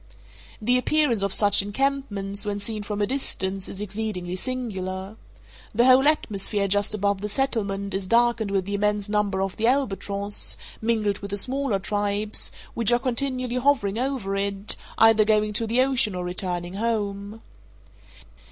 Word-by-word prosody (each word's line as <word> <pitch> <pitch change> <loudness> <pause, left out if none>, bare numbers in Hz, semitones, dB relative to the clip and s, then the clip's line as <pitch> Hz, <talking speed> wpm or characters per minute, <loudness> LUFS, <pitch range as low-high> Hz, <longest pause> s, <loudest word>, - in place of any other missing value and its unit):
The 245 +4 +2
appearance 275 -5 +2
of 200 -1 0
such 205 0 +5
encampments, 205 -3 -2
when 205 -1 -3
seen 215 +1 -2
from 205 0 -3
a - - +3
distance, 195 -7 -2
is 195 - -5
exceedingly 200 -3 -4
singular. 190 -4 -4 0.6
The 235 +3 +4
whole 260 +2 +6
atmosphere 205 -8 +1
just 205 +2 +2
above 200 -1 0
the 210 - -3
settlement 200 -5 -1
is 190 -1 -2
darkened 235 -1 +2
with 195 -2 0
the 200 - -4
immense 210 0 0
number 205 -2 0
of 195 -1 -4
the 225 +1 +1
albatross 205 -6 0 0.2
(mingled 220 -3 0
with 200 - -7
the 200 - -3
smaller 260 0 +1
tribes) 205 +1 -1 0.2
which 230 -1 +2
are 240 - +5
continually 255 0 -1
hovering 245 -6 +1
over 250 -7 -2
it, 200 0 +1 0.2
either 225 -1 +6
going 210 0 +1
to 225 +2 +1
the 235 +3 +2
ocean 255 -7 +2
or 180 - -3
returning 180 -1 -3
home. 205 -1 -3
210 Hz, 155 wpm, -24 LUFS, 200-235 Hz, 0.6 s, whole